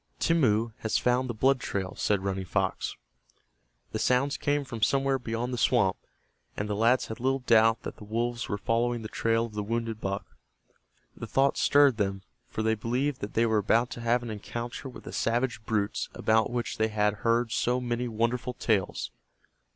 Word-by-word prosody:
"Timmeu 115 -9 +2
has 110 - 0
found 125 +1 +1
the - - -1
blood 130 +4 +3
trail," 95 -5 -3
said 100 -2 0
Running 95 -1 -2
Fox. 90 - -1 1.0
The - - -3
sounds 135 +3 +2
came 145 0 0
from 115 -4 -7
somewhere 135 +3 +2
beyond 120 +1 -3
the 125 - -2
swamp, 105 -8 +3 0.6
and 100 - -2
the 105 - -2
lads 115 +4 +3
had 110 - -7
little 135 +2 0
doubt 115 0 +4
that - - -6
the - - -11
wolves 115 +3 -2
were 100 - -1
following 115 +2 0
the - - -4
trail 115 +1 +1
of 115 - -10
the 105 - -2
wounded 115 +1 -3
buck. 100 0 -3 0.9
The - - -7
thought 135 +1 +2
stirred 140 -4 +4
them, 95 -2 -1 0.2
for 110 - -3
they 110 0 +3
believed 125 +6 -1
that 105 - -6
they 115 - +4
were 110 -2 +2
about 115 +4 +2
to 120 - -6
have 120 +1 +1
an 120 - -5
encounter 120 +5 -6
with 125 - -11
the - - -8
savage 120 -1 0
brutes 105 -2 -1
about 110 0 +2
which 120 -3 -3
they 110 - +3
had 105 -1 +1
heard 115 0 +2
so 120 +1 +1
many 125 0 -2
wonderful 120 +2 -1
tales. 100 -5 0
115 Hz, 190 wpm, -28 LUFS, 110-125 Hz, 1.0 s, doubt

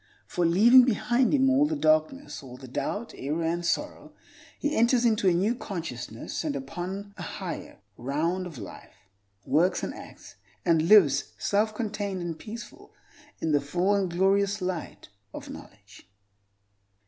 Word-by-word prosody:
For, 175 -1 0
leaving 235 +9 +7
behind 245 +1 +2
him 270 -2 +3
all 275 +2 +4
the 315 - -2
darkness, 155 - +1
all 125 -2 -11
the 130 - -11
doubt, 145 - -4
error, 150 +5 -3
and 170 +1 -1
sorrow, 170 - -2 0.4
he 295 +1 -1
enters 240 +1 +3
into 220 -4 +3
a - - +3
new 195 +7 +2
consciousness 160 - -6
and 150 -3 -2
upon 180 +9 -6
a - - -8
higher - - -6 0.2
round 165 +8 -1
of 160 -6 -10
life, 100 -4 -10 0.5
works, 175 +4 +2
and - - -3
acts, - - -13 0.3
and 165 -2 +3
lives 195 -10 +5
self 215 +2 0
contained 205 -3 -3
and 170 -2 -5
peaceful, 230 +2 -10 0.5
in 160 - 0
the 145 -1 +3
full 180 +7 0
and 195 -2 +1
glorious 195 +3 +2
light 180 - -5 0.3
of - - -8
knowledge. - - -14
185 Hz, 150 wpm, -27 LUFS, 160-215 Hz, 0.5 s, leaving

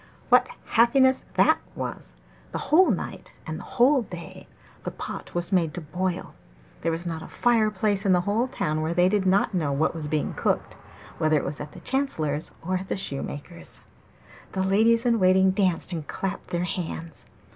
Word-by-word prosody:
What - - +6 0.2
happiness 260 +3 +4
that - - +5 0.2
was! - - -6 0.4
The - - -1
whole 345 +2 +7
night 200 - -3
and 155 0 -5
the - - -9
whole 260 +3 +5
day 175 -6 -9 0.4
the - - -2
pot - - -7
was 175 +2 -2
made 170 -5 +2
to 175 - -4
boil; 180 +3 -3 0.5
there 165 - 0
was 165 +2 -3
not 165 -2 -3
a - - -8
fire 230 -3 +2
place 205 -1 0
in 195 - +3
the 180 -1 +4
whole 210 +7 0
town 155 -11 -2
where 160 +2 -1
they 180 0 +5
did 195 0 +1
not 195 +2 +3
know 160 -6 0
what 150 +3 +1
was 160 -3 -5
being 150 0 -1
cooked, - - -1 0.4
whether 155 0 +3
it - - -1
was 145 - -4
at 150 0 -8
the - - -11
chancellor's 160 - -1
or 185 +2 0
at 190 - -8
the - - -2
shoemaker's. 140 - -6 0.7
The 190 - 0
ladies 225 +5 +3
in 235 -2 +3
waiting 190 0 +5
danced 185 -2 +1
and 160 -4 -4
clapped 195 0 -4
their 175 0 -1
hands. 165 -2 -5
185 Hz, 190 wpm, -26 LUFS, 160-210 Hz, 0.7 s, whole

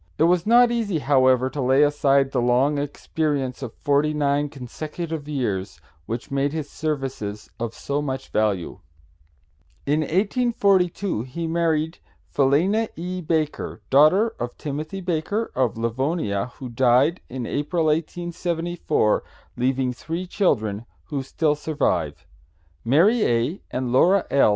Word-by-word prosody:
It - - +3
was 175 +2 +3
not 240 +1 +6
easy, 220 -7 0
however, 130 -3 +3
to 145 - -3
lay 130 +3 +4
aside 140 -2 +3
the 125 - 0
long 130 +4 +2
experience 145 -2 -2
of 120 -4 -6
forty 145 +2 +1
nine 145 0 +1
consecutive 155 +3 -6
years, 100 - -2 0.3
which 115 +3 -5
made 140 +1 0
his 155 -3 -3
services 135 -9 -4
of 115 -1 -4
so 140 +1 -2
much 135 -2 -4
value. 105 -5 -1 1.1
"In 150 +2 +2
1842 195 - +1
he 130 +8 -5
married 160 -1 0 0.3
Philena 175 +11 +2
E. 180 +2 -4
Baker, 155 -8 -2
daughter 155 +11 +5
of 120 0 -4
Timothy 155 +6 -5
Baker, 180 +6 -2
of 125 -4 0
Livonia, 115 - -1
who 130 - -7
died 130 +7 +3
in 125 -1 -5
April, 155 +5 -1
1874, 170 -4 0 0.3
leaving 130 +1 0
three 165 +8 -5
children, 115 - 0 0.2
who 140 -3 -2
still 150 +3 0
survive. 135 - -1 0.6
Mary 185 - +4
A. 120 +10 0
and 125 -1 -3
Laura 180 +9 +4
L. 140 - +5
145 Hz, 130 wpm, -23 LUFS, 130-170 Hz, 1.1 s, not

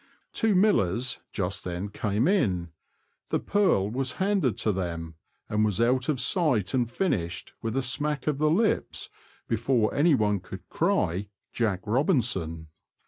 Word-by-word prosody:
Two 220 -3 +2
millers 130 - +2
just 95 -1 -2
then 90 +3 -4
came 105 +5 0
in; 95 - +1 0.6
the - - +1
purl 195 - +2
was 130 +4 -2
handed 190 - +1
to 110 - +1
them, 85 -4 -4 0.3
and 105 0 +1
was 105 -1 +1
out 125 +3 +2
of 140 -4 0
sight 130 - +1
and 125 -3 +1
finished, 90 - -2
with 115 +3 -2
a 135 - +1
smack 145 +3 -2
of 150 -2 0
the 155 0 +3
lips, 210 +8 0 0.4
before 115 0 +1
one 120 - +3
could 90 0 -10
cry 90 +5 0 0.3
"Jack 105 -6 0
Robinson." 105 - 0
115 Hz, 140 wpm, -27 LUFS, 95-145 Hz, 0.6 s, the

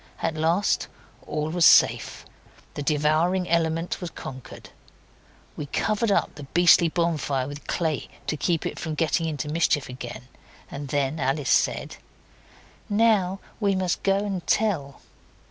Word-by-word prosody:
At - - 0
last 165 +6 +1 0.4
all 150 +1 -2
was 175 0 +1
safe; - - +4 0.5
the - - -5
devouring 155 +5 +1
element 165 +1 0
was 175 - -4
conquered. 130 -5 -10 0.8
We 145 - -6
covered 215 +8 0
up - - +1
the 145 -1 -10
beastly 175 -1 +6
bonfire 150 -6 -1
with 145 +1 -9
clay 160 -4 -1 0.2
to - - -1
keep 165 +2 -1
it - - -4
from 155 -1 -4
getting 165 +1 0
into 150 -2 -3
mischief 150 -3 +1
again, 125 -1 -8 0.4
and 140 0 -6
then 145 +2 -1
Alice 135 +1 0
said - - +1 0.9
'Now 205 -3 +2 0.2
we 200 -3 +1
must 185 -2 -1
go 195 0 +2
and 195 -4 -3
tell. 170 -11 0
160 Hz, 140 wpm, -25 LUFS, 145-180 Hz, 0.9 s, beastly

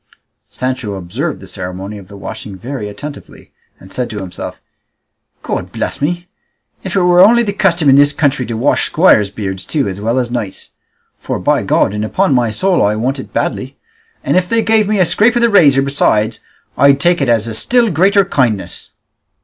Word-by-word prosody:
Sancho 130 -5 -4
observed 115 - -4
the - - -12
ceremony 95 +2 -7
of 95 - -14
the 100 +1 -12
washing 105 0 -8
very 115 -1 -6
attentively, 145 +8 -10 0.3
and 95 +1 -15
said 125 -2 -3
to 110 - -7
himself, 95 -3 -7 0.8
"God - - -4
bless - - -3
me, 175 +4 -2 0.6
if 190 -1 -5
it 195 - +3
were 180 0 +4
only 235 +6 +6
the 200 -3 -2
custom 180 -6 +1
in 135 0 +6
this 145 0 +5
country 140 -4 0
to 115 -1 -4
wash 130 +6 +1
squires' 130 - +3
beards 95 -2 -5
too 145 -4 -1
as 95 +1 -5
well 115 +4 -1
as 125 -2 -1
knights'. 110 -6 -5 0.5
For - - -4
by - - +1
God 95 - +1
and 105 0 -3
upon 185 - +1
my 120 -3 +2
soul 185 - +1
I 105 +1 +1
want 130 +5 -2
it - - -9
badly; - - -3 0.5
and 140 - 0
if 180 -1 +1
they 230 -1 +1
gave 220 -2 +2
me 215 0 0
a 185 - +4
scrape 210 +8 +2
of 240 - +2
the 235 - +4
razor 140 -9 +5
besides 115 -5 +1 0.4
I'd 140 0 +5
take 175 +2 +2
it 135 - +1
as 115 -1 +1
a 115 - -4
still 235 - +2
greater 195 +5 +3
kindness." 120 - -2
135 Hz, 200 wpm, -15 LUFS, 105-180 Hz, 0.8 s, only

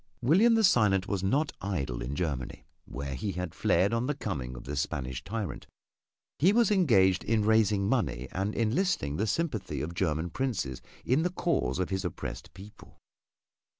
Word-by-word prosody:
William 200 - +5
the 225 - +3
Silent 105 - +4
was 100 -3 -1
not 140 +11 +1
idle 70 -11 -3
in 65 +4 -4
Germany, 70 -7 -3 0.2
where 70 0 -5
he 95 +10 -3
had 90 -2 -4
fled 95 +6 +2
on 115 +2 0
the 145 - -1
coming 70 - -4
of - - -9
this 70 +1 -2
Spanish 65 -3 -4
tyrant; 100 - -5 0.7
he 180 +7 +5
was 230 0 +3
engaged 100 - +4
in 110 -2 +1
raising 105 -3 +3
money 105 - 0
and 100 +3 -2
enlisting 115 - 0
the 110 - 0
sympathy 150 - -2
of 85 +3 -4
German 85 -1 -1
princes 100 - -2 0.2
in 130 +5 +3
the 175 - +1
cause 165 - -1
of 95 +1 -2
his 95 0 -1
oppressed 90 - -6
people. 100 +3 -14
100 Hz, 170 wpm, -29 LUFS, 75-125 Hz, 0.7 s, William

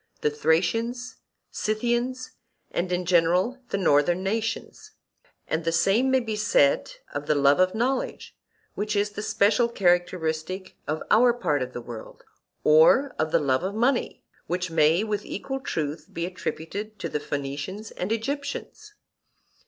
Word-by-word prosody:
the 150 - +1
Thracians, 225 +12 0 0.3
Scythians, 240 +4 -1 0.4
and 180 +1 -2
in 180 0 -1
general 180 +8 +2
the - - -1
northern 175 0 +3
nations; 225 - -3 0.5
and 160 +1 -1
the 165 - 0
same 195 +10 +3
may 260 0 +4
be 220 -2 -3
said 205 -9 +2 0.2
of 145 0 -4
the 150 - +3
love 140 +1 +4
of 185 +2 +3
knowledge, 250 +4 -2 0.4
which 210 +1 -2
is 205 +1 +1
the 210 - -6
special 215 +3 +2
characteristic 175 -2 0
of 155 +2 -2
our 240 +2 +6
part 150 - 0
of 130 0 -4
the 120 - -5
world, 115 -2 -10 0.4
or 160 - +5
of 155 0 0
the - - +5
love 130 -1 +1
of 190 +3 -3
money, 245 +3 0 0.2
which 180 0 -2
may, 160 +4 +4
with 210 -1 -2
equal 270 +7 -4
truth, 155 - -3
be 170 - -3
attributed 190 +4 -5
to - - -4
the 150 - -2
Phoenicians 145 +10 -5
and 185 +4 -4
Egyptians. 280 - -4
185 Hz, 150 wpm, -25 LUFS, 160-230 Hz, 0.5 s, our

